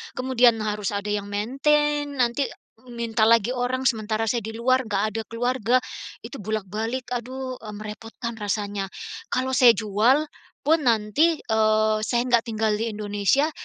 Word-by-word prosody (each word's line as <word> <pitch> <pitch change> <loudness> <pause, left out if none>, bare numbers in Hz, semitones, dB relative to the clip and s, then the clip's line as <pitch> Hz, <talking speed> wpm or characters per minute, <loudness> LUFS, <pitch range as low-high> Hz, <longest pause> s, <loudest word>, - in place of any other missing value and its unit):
kemudian 250 -2 +4
harus 210 -1 -2
ada 200 +1 -3
yang 205 -1 -2
maintenance, 290 +7 +1
nanti 245 +1 +1 0.5
minta 230 -2 0
lagi 230 +1 +4
orang, 255 +1 -1
sementara 220 -3 0
saya 235 +2 0
di 220 +1 -7
luar 255 +1 +1
enggak 200 -1 0
ada 225 +1 -3
keluarga, 245 +1 +1 0.4
itu 275 - -8
bolak-balik. 215 +4 -3
Aduh, 255 +1 -4
e 215 - -10
merepotkan 225 +2 -7
rasanya. 205 -1 -2 0.4
Kalau 260 +1 -1
saya 250 -4 +6
jual, 220 +8 +2 0.4
pun 320 +3 +4
nanti, 235 +9 +2
eee, 215 -1 +2
saya 240 0 +1
enggak 240 -1 +2
tinggal 220 -1 0
di 230 - -1
Indonesia, 210 +8 +1
230 Hz, 145 wpm, -24 LUFS, 215-255 Hz, 0.5 s, saya